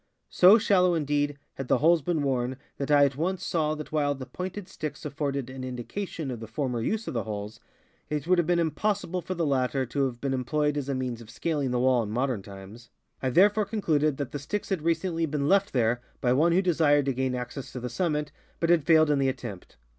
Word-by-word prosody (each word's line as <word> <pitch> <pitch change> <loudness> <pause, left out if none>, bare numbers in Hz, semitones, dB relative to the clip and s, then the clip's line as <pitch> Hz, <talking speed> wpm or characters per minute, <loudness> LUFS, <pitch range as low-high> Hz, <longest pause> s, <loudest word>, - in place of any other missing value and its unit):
So 190 +5 +7
shallow, 180 -5 +3
indeed, 145 -2 0 0.2
had 135 - -6
the - - +3
holes 165 +2 +4
been 160 +1 -1
worn 130 -2 -1 0.2
that 140 - -3
I 145 -1 +6
at 135 -2 -1
once 180 +6 -2
saw 155 -2 0
that 150 -1 -8
while 145 -2 +1
the 130 -1 -7
pointed 180 +7 -6
sticks 155 -6 -6
afforded 140 -3 -2
an 130 0 -7
indication 135 - -5
of 120 - -5
the 110 - -8
former 125 0 -2
use 220 - -2
of - - -3
the 115 - 0
holes, 105 0 -6 0.5
it 150 -1 -2
would 180 +1 +3
have 170 - +1
been 175 0 +3
impossible 180 +2 -1
for 185 +2 -4
the 170 -1 0
latter 135 -1 +1
to 135 +3 0
have 120 -2 -7
been 135 +1 -1
employed 150 +4 0
as 140 -2 -3
a 140 - 0
means 125 -2 -3
of 110 - -13
scaling 140 +4 -2
the 125 0 0
wall 125 -1 +3
in 110 - -4
modern 125 -1 -1
times. 100 +4 -12 0.3
I 130 - 0
therefore 205 - +4
con 210 +1 -4
cluded 150 -4 +2
that 140 -4 -4
the 145 - -4
sticks 200 +9 -4
had 190 -5 -1
recently 165 0 0
been 145 -1 -1
left 200 +3 +3
there 120 -1 +1 0.2
by 125 -1 +2
one 160 +6 +3
who 185 +3 +3
desired 150 -5 +3
to 135 - 0
gain 130 0 -1
access 125 +2 -6
to 125 - -4
the 125 - -4
summit, 150 +2 -1 0.3
but 165 0 +2
had 165 -5 +3
failed 155 -2 +5
in 145 - +2
the 135 -1 +2
at 130 - -3
tempt. 105 -8 -9
145 Hz, 235 wpm, -27 LUFS, 125-165 Hz, 0.5 s, So